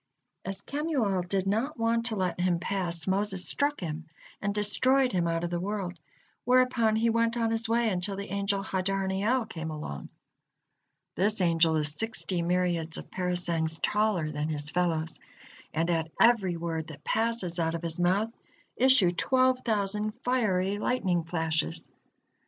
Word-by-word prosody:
As 195 Hz, 0 st, -4 dB
Kemuel 275 Hz, -, 0 dB
did 185 Hz, +1 st, -1 dB
not 225 Hz, +10 st, -1 dB
want 230 Hz, 0 st, +1 dB
to 225 Hz, -, -2 dB
let 185 Hz, -3 st, -1 dB
him 180 Hz, -1 st, +2 dB
pass, 175 Hz, -2 st, -1 dB
Moses 195 Hz, -1 st, 0 dB
struck 290 Hz, -2 st, 0 dB
him 160 Hz, -1 st, -5 dB, 0.3 s
and 205 Hz, -, 0 dB
destroyed 255 Hz, +6 st, +2 dB
him 175 Hz, -2 st, +1 dB
out 165 Hz, 0 st, -1 dB
of 175 Hz, -, -2 dB
the 175 Hz, -, -1 dB
world, 195 Hz, -1 st, -3 dB, 0.5 s
whereupon 250 Hz, -3 st, +3 dB
he 230 Hz, +1 st, +2 dB
went 230 Hz, +1 st, +1 dB
on 225 Hz, -1 st, +1 dB
his 225 Hz, 0 st, 0 dB
way 235 Hz, 0 st, +2 dB
until 195 Hz, 0 st, -1 dB
the 200 Hz, -1 st, -6 dB
angel 200 Hz, 0 st, 0 dB
Hadarniel 195 Hz, +5 st, 0 dB
came 160 Hz, -6 st, -6 dB
along. 150 Hz, -, -6 dB, 1.0 s
This 205 Hz, +3 st, +1 dB
angel 165 Hz, -2 st, +3 dB
is 150 Hz, -1 st, 0 dB
sixty 195 Hz, -2 st, -2 dB
myriads 170 Hz, -2 st, 0 dB
of -, -, -10 dB
parasangs 175 Hz, -3 st, 0 dB
taller 205 Hz, -7 st, +1 dB
than 150 Hz, +1 st, -2 dB
his 150 Hz, -1 st, -1 dB
fellows, 165 Hz, -2 st, -1 dB, 0.5 s
and 165 Hz, +2 st, 0 dB
at 160 Hz, -1 st, 0 dB
every 205 Hz, -7 st, +4 dB
word 165 Hz, -1 st, -3 dB
that 150 Hz, -2 st, -11 dB
passes 220 Hz, -6 st, +1 dB
out 165 Hz, 0 st, 0 dB
of 170 Hz, -, -5 dB
his 165 Hz, 0 st, -4 dB
mouth, 195 Hz, +6 st, +2 dB, 0.4 s
issue 255 Hz, -8 st, +5 dB
twelve 255 Hz, +7 st, +2 dB
thousand 210 Hz, -2 st, -1 dB
fiery 205 Hz, -6 st, +1 dB
lightning 190 Hz, -9 st, 0 dB
flashes. 160 Hz, -2 st, -1 dB
190 Hz, 155 wpm, -28 LUFS, 170-225 Hz, 1.0 s, issue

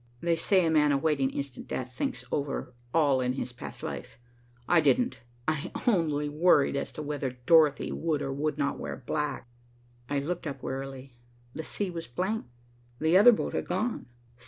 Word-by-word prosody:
They 170 Hz, +3 st, +1 dB
say 185 Hz, +2 st, +3 dB
a 160 Hz, -, +2 dB
man 150 Hz, -2 st, +4 dB
awaiting 140 Hz, -1 st, +2 dB
instant 140 Hz, -2 st, -5 dB
death 130 Hz, 0 st, -4 dB
thinks 125 Hz, 0 st, -3 dB
over 140 Hz, -3 st, -2 dB, 0.2 s
all 145 Hz, -4 st, +3 dB
his 125 Hz, 0 st, -2 dB
past 120 Hz, -, -9 dB
life. -, -, -6 dB, 0.5 s
I 175 Hz, -2 st, +5 dB
didn't, 250 Hz, +6 st, +2 dB, 0.3 s
I 155 Hz, -2 st, -1 dB
only 155 Hz, -9 st, +2 dB
worried 150 Hz, -2 st, +4 dB
as 140 Hz, -, -2 dB
to 155 Hz, -, -5 dB
whether 145 Hz, -3 st, -3 dB
Dorothy 155 Hz, -3 st, +5 dB
would 155 Hz, -3 st, -1 dB
or 135 Hz, -, -2 dB
would 150 Hz, +1 st, -1 dB
not 140 Hz, -1 st, -1 dB
wear -, -, -5 dB
black. 150 Hz, -3 st, -2 dB, 0.6 s
I 145 Hz, -, 0 dB
looked 165 Hz, +4 st, -2 dB
up 135 Hz, -2 st, -6 dB
wearily. 135 Hz, 0 st, -5 dB, 0.4 s
The -, -, -4 dB
sea 195 Hz, +3 st, -2 dB
was 165 Hz, -1 st, -6 dB
blank. 190 Hz, -, -2 dB, 0.5 s
The 160 Hz, +3 st, +3 dB
other 210 Hz, +6 st, +9 dB
boat 220 Hz, -, -1 dB
had -, -, -2 dB
gone. 230 Hz, -, -2 dB
150 Hz, 170 wpm, -29 LUFS, 135-165 Hz, 0.6 s, other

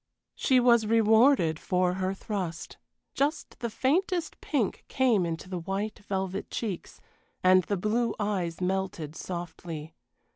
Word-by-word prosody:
She 260 Hz, -1 st, +3 dB
was 235 Hz, -3 st, +4 dB
rewarded 220 Hz, -, +4 dB
for 180 Hz, 0 st, +1 dB
her 185 Hz, 0 st, -1 dB
thrust: 185 Hz, -5 st, -5 dB, 0.4 s
just 290 Hz, +2 st, -1 dB
the 235 Hz, -, -2 dB
faintest 340 Hz, -, 0 dB
pink 255 Hz, -10 st, -1 dB
came 235 Hz, -9 st, +2 dB
into 165 Hz, +2 st, -4 dB
the 185 Hz, -1 st, -4 dB
white 195 Hz, +5 st, -3 dB
velvet 195 Hz, -1 st, -3 dB
cheeks, 205 Hz, -7 st, -5 dB, 0.4 s
and 185 Hz, -1 st, +6 dB
the 200 Hz, -, -1 dB
blue 220 Hz, +4 st, 0 dB
eyes 190 Hz, -5 st, -1 dB
melted 180 Hz, -5 st, -2 dB
softly. 165 Hz, -2 st, -6 dB
195 Hz, 130 wpm, -28 LUFS, 180-230 Hz, 0.4 s, and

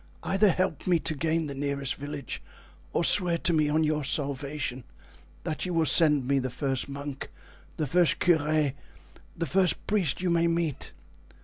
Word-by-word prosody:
Either 195 Hz, +2 st, +3 dB
help 185 Hz, -3 st, -1 dB
me 180 Hz, -2 st, +4 dB
to 160 Hz, -, -3 dB
gain 160 Hz, +2 st, -1 dB
the 140 Hz, -, -5 dB
nearest 140 Hz, -1 st, -2 dB
village 145 Hz, -2 st, -6 dB, 0.5 s
or -, -, 0 dB
swear 175 Hz, -2 st, +4 dB
to 170 Hz, +1 st, -1 dB
me 155 Hz, -2 st, +2 dB
on 155 Hz, +2 st, +2 dB
your 150 Hz, -1 st, 0 dB
salvation 140 Hz, -2 st, -3 dB, 0.6 s
that 155 Hz, -, -3 dB
you 180 Hz, -2 st, -2 dB
will 165 Hz, -1 st, +2 dB
send 150 Hz, -6 st, +5 dB
me 140 Hz, 0 st, +2 dB
the 130 Hz, 0 st, -3 dB
first 135 Hz, +1 st, -2 dB
monk, 140 Hz, 0 st, -6 dB, 0.5 s
the 155 Hz, -, -1 dB
first 170 Hz, +4 st, +3 dB
curé, 155 Hz, -4 st, +2 dB, 0.6 s
the 165 Hz, -, -1 dB
first 180 Hz, +4 st, +1 dB
priest 195 Hz, -9 st, +1 dB
you 180 Hz, -1 st, 0 dB
may 170 Hz, 0 st, +2 dB
meet. 165 Hz, -4 st, -2 dB
155 Hz, 170 wpm, -27 LUFS, 140-170 Hz, 0.6 s, send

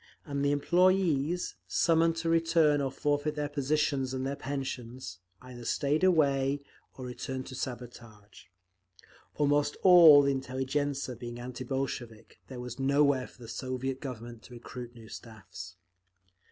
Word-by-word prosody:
And 140 Hz, -1 st, -3 dB
the 145 Hz, -, +2 dB
employees, 175 Hz, 0 st, +2 dB
summoned 165 Hz, 0 st, +3 dB
to 165 Hz, 0 st, -2 dB
return 165 Hz, -3 st, +3 dB
or 135 Hz, -, 0 dB
forfeit 145 Hz, +2 st, -1 dB
their 150 Hz, -1 st, -2 dB
positions 140 Hz, -2 st, 0 dB
and 130 Hz, 0 st, -3 dB
their 140 Hz, +1 st, -2 dB
pensions, 130 Hz, -, -5 dB, 0.2 s
either 125 Hz, -1 st, -10 dB
stayed 145 Hz, +7 st, 0 dB
away 140 Hz, -6 st, +3 dB, 0.4 s
or 130 Hz, -, -7 dB
returned 130 Hz, +1 st, -5 dB
to 130 Hz, -, -8 dB
sabotage…. 120 Hz, -5 st, -8 dB, 0.9 s
Almost 145 Hz, 0 st, +1 dB
all 170 Hz, -6 st, +9 dB
the 140 Hz, 0 st, +2 dB
intelligentzia 135 Hz, +1 st, -2 dB
being 120 Hz, -1 st, -7 dB
anti 125 Hz, +1 st, -7 dB
Bolshevik, 120 Hz, -4 st, -5 dB
there 130 Hz, -2 st, -8 dB
was 125 Hz, +1 st, -7 dB
nowhere 140 Hz, -1 st, +2 dB
for 125 Hz, -, -16 dB
the -, -, -9 dB
Soviet 130 Hz, +2 st, -4 dB
Government 120 Hz, -3 st, -7 dB
to 125 Hz, -, -13 dB
recruit 120 Hz, 0 st, -9 dB
new 115 Hz, -2 st, -13 dB
staffs…. 95 Hz, -5 st, -10 dB
135 Hz, 140 wpm, -30 LUFS, 125-145 Hz, 0.9 s, all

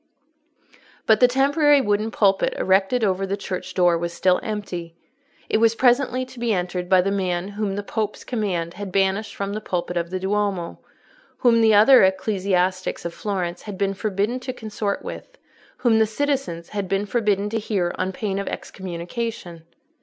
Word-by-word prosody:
But 220 Hz, -1 st, +4 dB
the 250 Hz, -, +7 dB
temporary 285 Hz, +3 st, +4 dB
wooden 210 Hz, -2 st, 0 dB
pulpit 195 Hz, -3 st, +2 dB
erected 195 Hz, +6 st, +2 dB
over 195 Hz, -1 st, +1 dB
the 200 Hz, +1 st, -2 dB
church 185 Hz, -2 st, -6 dB
door 175 Hz, -2 st, +3 dB
was 170 Hz, 0 st, -3 dB
still 180 Hz, +1 st, +2 dB
empty. 180 Hz, -6 st, -5 dB, 0.5 s
It -, -, +1 dB
was 230 Hz, 0 st, +4 dB
presently 255 Hz, +1 st, +2 dB
to 255 Hz, -1 st, -13 dB
be 235 Hz, -1 st, 0 dB
entered 180 Hz, -2 st, -2 dB
by 185 Hz, -1 st, +6 dB
the 195 Hz, +2 st, -1 dB
man 185 Hz, -1 st, -1 dB
whom 205 Hz, -1 st, -3 dB
the 205 Hz, -, -3 dB
Pope's 215 Hz, 0 st, -3 dB
command 185 Hz, -8 st, -2 dB
had 205 Hz, -2 st, -7 dB
banished 195 Hz, +2 st, 0 dB
from 200 Hz, 0 st, -3 dB
the 215 Hz, -, -4 dB
pulpit 180 Hz, -3 st, -3 dB
of 170 Hz, 0 st, -2 dB
the 185 Hz, +1 st, -3 dB
Duomo, 195 Hz, -2 st, -1 dB, 0.6 s
whom 230 Hz, -2 st, +4 dB
the 220 Hz, -1 st, +5 dB
other 245 Hz, +5 st, +7 dB
ecclesiastics 190 Hz, -2 st, 0 dB
of 170 Hz, -, -4 dB
Florence 185 Hz, -4 st, -3 dB
had 205 Hz, -3 st, -7 dB
been 195 Hz, 0 st, 0 dB
forbidden 205 Hz, +4 st, -1 dB
to 255 Hz, 0 st, -5 dB
consort 215 Hz, -3 st, -4 dB
with, -, -, -8 dB, 0.4 s
whom 225 Hz, -3 st, +3 dB
the 220 Hz, -, +4 dB
citizens 255 Hz, -8 st, -2 dB
had 200 Hz, -2 st, -3 dB
been 195 Hz, +1 st, 0 dB
forbidden 205 Hz, -2 st, 0 dB
to 225 Hz, -, 0 dB
hear 195 Hz, -5 st, -1 dB
on 185 Hz, +1 st, -1 dB
pain 195 Hz, 0 st, -3 dB
of 200 Hz, -, -4 dB
excommunication. 180 Hz, -1 st, -6 dB
200 Hz, 175 wpm, -23 LUFS, 185-220 Hz, 0.6 s, the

